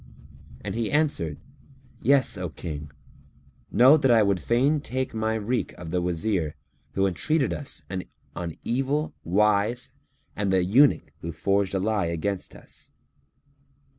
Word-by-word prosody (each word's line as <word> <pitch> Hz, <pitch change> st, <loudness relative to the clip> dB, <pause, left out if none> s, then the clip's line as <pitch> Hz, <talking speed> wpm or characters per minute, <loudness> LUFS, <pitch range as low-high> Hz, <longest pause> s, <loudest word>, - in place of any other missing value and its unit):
and -, -, -4 dB
he 115 Hz, -1 st, -1 dB
answered, 140 Hz, -, 0 dB, 0.6 s
"Yes, 130 Hz, -2 st, +3 dB
O 90 Hz, -3 st, -4 dB
King, 75 Hz, -2 st, -7 dB, 0.8 s
know 130 Hz, +8 st, +7 dB
that 135 Hz, -3 st, +2 dB
I 115 Hz, -2 st, +6 dB
would 100 Hz, -2 st, +1 dB
fain 135 Hz, -, +2 dB
take 130 Hz, -1 st, -3 dB
my 110 Hz, 0 st, 0 dB
wreak 110 Hz, +3 st, -1 dB
of 80 Hz, -2 st, -9 dB
the 90 Hz, 0 st, +1 dB
Wazir 85 Hz, -2 st, -1 dB, 0.4 s
who 95 Hz, -, +2 dB
entreated 135 Hz, -, +1 dB
us 145 Hz, -, -5 dB, 0.5 s
on 85 Hz, -3 st, -5 dB
evil 135 Hz, +5 st, -1 dB
wise 105 Hz, +5 st, +2 dB, 0.4 s
and 100 Hz, -2 st, 0 dB
the 95 Hz, -1 st, +3 dB
eunuch 130 Hz, +11 st, +4 dB
who 85 Hz, -, -4 dB
forged 100 Hz, +4 st, 0 dB
a -, -, +1 dB
lie 100 Hz, -2 st, 0 dB
against 90 Hz, +3 st, -3 dB
us." -, -, -12 dB
105 Hz, 135 wpm, -26 LUFS, 90-125 Hz, 0.8 s, know